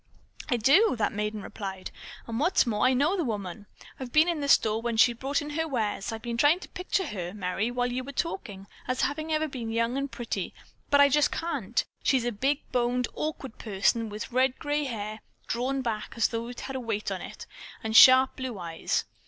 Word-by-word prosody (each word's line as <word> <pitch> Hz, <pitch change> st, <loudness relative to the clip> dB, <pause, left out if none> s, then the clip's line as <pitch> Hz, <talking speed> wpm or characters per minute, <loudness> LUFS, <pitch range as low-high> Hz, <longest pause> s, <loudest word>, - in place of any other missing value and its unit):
"I 245 Hz, -, +2 dB
do," 275 Hz, -, +5 dB
that 215 Hz, -, +1 dB
maiden 210 Hz, 0 st, -3 dB
replied, 190 Hz, -3 st, -6 dB, 0.3 s
"and, 230 Hz, 0 st, -4 dB
what's 335 Hz, +2 st, +3 dB
more, 230 Hz, +1 st, +2 dB
I 260 Hz, -, +3 dB
know 295 Hz, +9 st, +2 dB
the 360 Hz, -, 0 dB
woman. 205 Hz, -, -5 dB, 0.3 s
I've 255 Hz, -2 st, -6 dB
been 310 Hz, +4 st, +5 dB
in 340 Hz, -3 st, 0 dB
the 285 Hz, -, -1 dB
store 220 Hz, -5 st, +4 dB
when 235 Hz, -1 st, -2 dB
she 240 Hz, +2 st, +6 dB
brought 270 Hz, +5 st, -2 dB
in 295 Hz, -, -6 dB
her 320 Hz, +2 st, -1 dB
wares. 220 Hz, -7 st, -2 dB
I've 225 Hz, 0 st, -6 dB
been 235 Hz, -1 st, -3 dB
trying 295 Hz, +7 st, +4 dB
to -, -, -10 dB
picture 375 Hz, +1 st, -2 dB
her, 185 Hz, -, -5 dB
Merry, 195 Hz, +3 st, -1 dB
while 245 Hz, 0 st, -1 dB
you 255 Hz, +1 st, -2 dB
were 275 Hz, -, -7 dB
talking, 230 Hz, -, -4 dB, 0.2 s
as 255 Hz, 0 st, -1 dB
having 310 Hz, +3 st, -1 dB
ever 310 Hz, 0 st, +1 dB
been 245 Hz, -5 st, -5 dB
young 230 Hz, +3 st, 0 dB
and 275 Hz, 0 st, -3 dB
pretty, 225 Hz, -6 st, -4 dB, 0.3 s
but 285 Hz, -, +4 dB
I 285 Hz, -, +8 dB
just 295 Hz, +1 st, +3 dB
can't. 340 Hz, +8 st, -2 dB, 0.2 s
She 265 Hz, -, +3 dB
is 240 Hz, -, -2 dB
a 240 Hz, -, 0 dB
big 270 Hz, +7 st, 0 dB
boned, 245 Hz, 0 st, 0 dB
awkward 295 Hz, -5 st, -5 dB
person 220 Hz, +2 st, 0 dB
with 210 Hz, +3 st, -6 dB
red 255 Hz, +1 st, +2 dB
grey 295 Hz, 0 st, -1 dB
hair 215 Hz, -3 st, -5 dB, 0.3 s
drawn 260 Hz, +3 st, -1 dB
back 220 Hz, -3 st, -3 dB
as 230 Hz, -, +3 dB
though 230 Hz, 0 st, -3 dB
it 245 Hz, 0 st, -8 dB
had 270 Hz, -, -6 dB
a -, -, -2 dB
weight 225 Hz, -4 st, -3 dB
on -, -, -3 dB
it, -, -, -9 dB, 0.4 s
and 220 Hz, 0 st, -2 dB
sharp 260 Hz, +2 st, +8 dB
blue 260 Hz, -4 st, -4 dB
eyes." 170 Hz, -3 st, -2 dB
245 Hz, 220 wpm, -27 LUFS, 220-280 Hz, 0.4 s, I